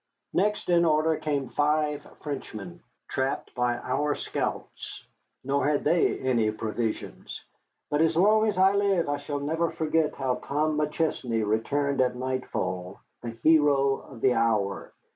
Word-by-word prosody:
Next 210 +2 +1
in 175 -1 +4
order 160 0 +3
came 145 -4 -2
five 150 0 +1 0.2
Frenchmen, 110 - -6 0.3
trapped 130 +1 -2
by 125 -1 0
our 145 +4 -1
scouts, - - -5 0.4
nor 140 +2 +1
had 145 -1 +1
they 165 +3 +2
any 120 -4 +1
provisions. 110 +1 -4 0.5
But 145 +1 +2
as 165 0 +2
long 215 +4 +5
as 210 - -1
I 190 +1 +5
live 200 -4 +2
I 145 0 0
shall 145 0 -4
never 160 +4 0
forget 160 -1 0
how 130 -2 -1
Tom 150 +2 0
McChesney 150 -7 -1
returned 140 +7 0
at 125 -1 +1
nightfall, 100 -8 -3 0.2
the 115 -1 -6
hero 145 -3 +4
of 125 -4 -13
the 130 - +4
hour. 110 -4 0
145 Hz, 145 wpm, -27 LUFS, 125-155 Hz, 0.5 s, long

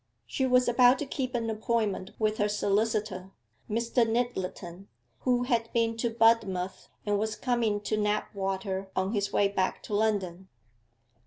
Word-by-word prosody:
She 265 - -1
was 250 0 +4
about 245 +1 +5
to 295 - -3
keep 260 -2 -3
an 230 -1 -1
appointment 215 -3 -1
with 215 -1 0
her 210 0 +2
solicitor, 205 -2 0 0.4
Mr. 230 +2 +1
Nyttleton, 200 -6 -3 0.3
who 245 -1 +1
had 235 -3 0
been 230 -1 +1
to 235 +1 0
Budmouth, 225 -5 +1 0.2
and 205 -1 +1
was 215 0 -1
coming 235 -5 0
to 215 +1 -1
Knapwater 195 -2 -2
on 190 +1 0
his 200 -2 -1
way 200 - +3
back 190 -2 -1
to - - -7
London. 195 -4 0
215 Hz, 150 wpm, -28 LUFS, 195-235 Hz, 0.4 s, about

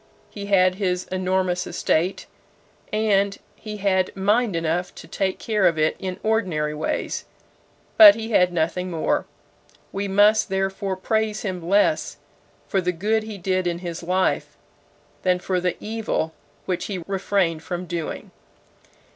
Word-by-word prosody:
He 200 -1 -7
had 185 -2 +4
his 180 -1 0
enormous 185 -1 0
estate, 175 +2 0 0.7
and 200 -2 +2 0.2
he 215 -1 -7
had 190 -2 +1
mind 205 +1 +2
enough 165 +2 -1
to - - -11
take 190 -1 -1
care 210 -4 +2
of 165 -2 +1
it 155 0 +2
in 185 -1 -5
ordinary 180 -9 0
ways; 150 +1 -3 0.7
but 315 -2 +11
he 225 0 -5
had 180 -4 +4
nothing 175 +2 -1
more. 165 -3 0 0.6
We 200 +1 -3
must 205 +3 +4
therefore 195 0 -1
praise 215 +2 -1
him 185 -4 -3
less 200 - +1 0.5
for 195 - +1
the 180 0 0
good 210 +6 0
he 215 -1 -7
did 185 0 0
in 170 -1 -1
his 175 -1 -6
life, 185 +2 0 0.6
than 180 -1 +2
for 180 0 -1
the 180 -1 -1
evil 215 -7 -2 0.3
which 180 -2 -2
he 185 -4 -4
refrained 190 -4 0
from 175 +1 -5
doing. 170 -2 -5
185 Hz, 145 wpm, -23 LUFS, 180-205 Hz, 0.7 s, but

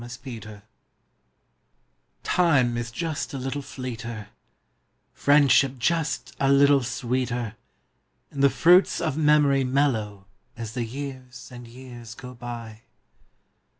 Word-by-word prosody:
A597234 115 -4 -9 1.8
IME 135 -9 +3
is 120 0 -3
"just 155 +3 -4
a - - -3
little 135 +2 -4
fleeter; 115 -5 -7 0.9
priendship 140 -2 +4
just 160 +5 -1
a 135 0 +3
little 140 0 +5
sweeter; 125 -2 -2 0.8
And 140 - -2
the - - +8
jruits 175 +8 +4
of 160 -5 -1
memoru 150 -3 +3
mellcrcO 125 -7 0
' 95 - -37
I - - -16
As 110 -1 -6
the 120 -2 -3
Ljears 130 0 -8
and 120 -1 -10
Ejears 120 -2 -11
ao 125 - -8
btj. 120 -2 -8
125 Hz, 115 wpm, -25 LUFS, 120-140 Hz, 1.8 s, the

